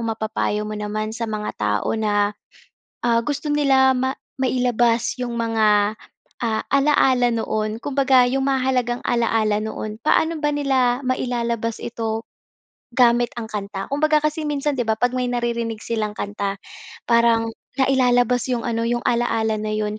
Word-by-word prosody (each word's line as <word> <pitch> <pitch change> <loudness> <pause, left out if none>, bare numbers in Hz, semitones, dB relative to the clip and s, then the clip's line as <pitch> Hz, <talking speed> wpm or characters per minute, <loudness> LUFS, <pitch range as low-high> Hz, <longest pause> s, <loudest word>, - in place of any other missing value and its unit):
mapapayo 220 -2 -2
mo 215 - -5
naman 215 +1 -3
sa 230 0 -4
mga 215 -1 -3
tao 105 -1 0
na, 205 -1 +1 0.7
ah, 230 -1 +3
gusto 295 +4 -3
nila 270 -3 +4
ma 260 +1 -1 0.2
mailabas 245 -2 +1
yung 240 -1 -3
mga 215 -3 +2 0.5
ah, 225 -2 0
ala-ala 270 -3 +4
noon. 215 -2 -1
Kumbaga 265 0 +3
yung 265 +2 0
mahahalagang 255 -2 0
ala-ala 225 -3 +1
noon, 215 0 -5
paano 320 +2 +1
ba 295 - +1
nila, 270 -3 +1
mailalabas 235 -3 -1
ito 225 -1 -4 0.7
gamit 240 -1 +3
ang 225 -2 -5
kanta? 200 -2 -5
Kumbaga 305 +1 +2
kasi 305 +1 -1
minsan 290 -1 -1
'di 245 - 0
ba, 220 - +2
pag 245 +2 +1
may 250 0 0
naririnig 235 -2 -2
silang 215 -2 -2
kanta 205 -1 -3 0.5
parang 235 -1 +3 0.3
nailalabas 250 -2 +3
yung 235 -2 -2
ano, 230 -1 -1
yung 240 0 -1
ala-ala 225 -2 +1
na 215 0 -3
yun. 210 0 -2
235 Hz, 145 wpm, -22 LUFS, 220-255 Hz, 0.7 s, nila